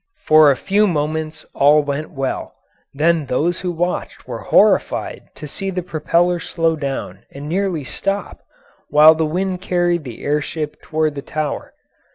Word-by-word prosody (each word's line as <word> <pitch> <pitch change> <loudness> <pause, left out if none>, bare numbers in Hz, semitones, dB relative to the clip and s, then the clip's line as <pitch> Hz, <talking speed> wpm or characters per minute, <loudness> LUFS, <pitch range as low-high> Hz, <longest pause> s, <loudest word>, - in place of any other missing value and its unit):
For 155 -1 +7
a 135 - +2
few 205 +6 +2
moments 155 -1 -2
all 145 +2 +4
went 145 +2 -3
well, 135 -2 -4 0.4
then 155 +1 +1
those 165 +8 0
who 180 -1 -2
watched 175 +1 -3
were - - -5
horrified - - +2
to 150 - -8
see 195 +7 -4
the 180 -1 -3
propeller 170 +2 +1
slow 165 -1 0
down 140 -3 -4
and 140 +1 -9
nearly 180 -2 -1
stop, 195 +9 -4 0.5
while 150 +2 +8
the 160 0 -1
wind 185 +3 -2
carried 175 -2 0
the 125 -5 -9
air 150 +1 +1
ship 150 0 -5
toward 155 -1 -1
the 140 - -6
Tower. 155 +1 -4
155 Hz, 160 wpm, -19 LUFS, 150-175 Hz, 0.5 s, while